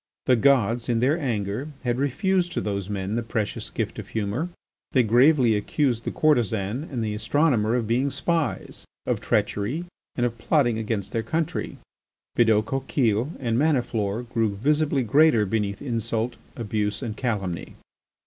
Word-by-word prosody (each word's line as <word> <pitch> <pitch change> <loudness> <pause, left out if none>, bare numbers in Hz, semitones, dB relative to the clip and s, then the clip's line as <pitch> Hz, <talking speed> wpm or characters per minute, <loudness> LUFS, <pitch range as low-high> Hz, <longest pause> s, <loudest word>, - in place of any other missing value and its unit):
The 125 - +5
gods, 120 -2 +2
in 115 -1 +2
their 140 +8 +2
anger, 115 -2 -2 0.2
had 120 0 0
refused 175 +7 +1
to - - -1
those 100 -2 -3
men 100 0 -3
the 120 - 0
precious 115 -2 -3
gift - - -3
of - - -7
humour. 110 - -2 0.4
They 130 - +5
gravely 120 +1 +5
accused 120 +2 0
the - - -1
courtesan 120 -4 +1
and 120 -4 -2
the 105 -1 -2
astronomer 115 0 +2
of 120 -2 0
being 125 +5 +1
spies, 145 - -2 0.2
of - - -1
treachery, 125 +13 0 0.3
and 120 - +1
of 115 -1 -3
plotting 120 -4 +2
against 105 -3 -3
their 115 - 0
country. 165 +4 -2 0.6
Bidault 110 -2 +4
Coquille 130 -2 0
and 120 -3 0
Maniflore 120 -7 0
grew 115 -4 -1
visibly 145 +4 +1
greater 135 -1 +4
beneath 100 0 -2
insult, 115 -1 -2 0.2
abuse, 105 0 -2
and 110 -3 -4
calumny. 100 -8 -3
120 Hz, 150 wpm, -25 LUFS, 105-140 Hz, 0.6 s, The